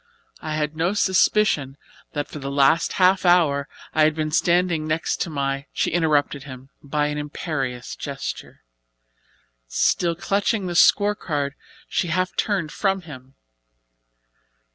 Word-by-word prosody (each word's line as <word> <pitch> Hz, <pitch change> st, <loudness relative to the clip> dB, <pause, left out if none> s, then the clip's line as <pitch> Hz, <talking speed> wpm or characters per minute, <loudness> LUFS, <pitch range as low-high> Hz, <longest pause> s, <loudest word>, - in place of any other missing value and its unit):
I 155 Hz, -1 st, -3 dB
had 150 Hz, 0 st, -2 dB
no 170 Hz, +4 st, 0 dB
suspicion 190 Hz, -8 st, +2 dB, 0.4 s
that 145 Hz, -1 st, -2 dB
for 150 Hz, -, -8 dB
the 135 Hz, 0 st, -5 dB
last 140 Hz, +4 st, +3 dB
half 185 Hz, +1 st, +3 dB
hour 160 Hz, -6 st, +3 dB, 0.2 s
I 155 Hz, -, +2 dB
had 155 Hz, 0 st, +4 dB
been 155 Hz, -1 st, -2 dB
standing 170 Hz, -1 st, +2 dB
next 155 Hz, +1 st, -1 dB
to -, -, -1 dB
my 140 Hz, -1 st, -2 dB
" -, -, -49 dB
She -, -, 0 dB
interrupted 150 Hz, -4 st, +1 dB
him 135 Hz, -1 st, -11 dB
by 150 Hz, +1 st, -1 dB
an 150 Hz, 0 st, -2 dB
imperious 140 Hz, -4 st, -4 dB
gesture. 140 Hz, -2 st, -6 dB, 1.0 s
Still -, -, +1 dB
clutching 200 Hz, +3 st, 0 dB
the 175 Hz, -, -3 dB
scorecard 170 Hz, -7 st, +2 dB, 0.3 s
she -, -, -1 dB
half 185 Hz, +2 st, -1 dB
turned 190 Hz, -7 st, -1 dB
from 195 Hz, -1 st, 0 dB
him. 135 Hz, -5 st, -12 dB
155 Hz, 140 wpm, -23 LUFS, 140-180 Hz, 1.0 s, had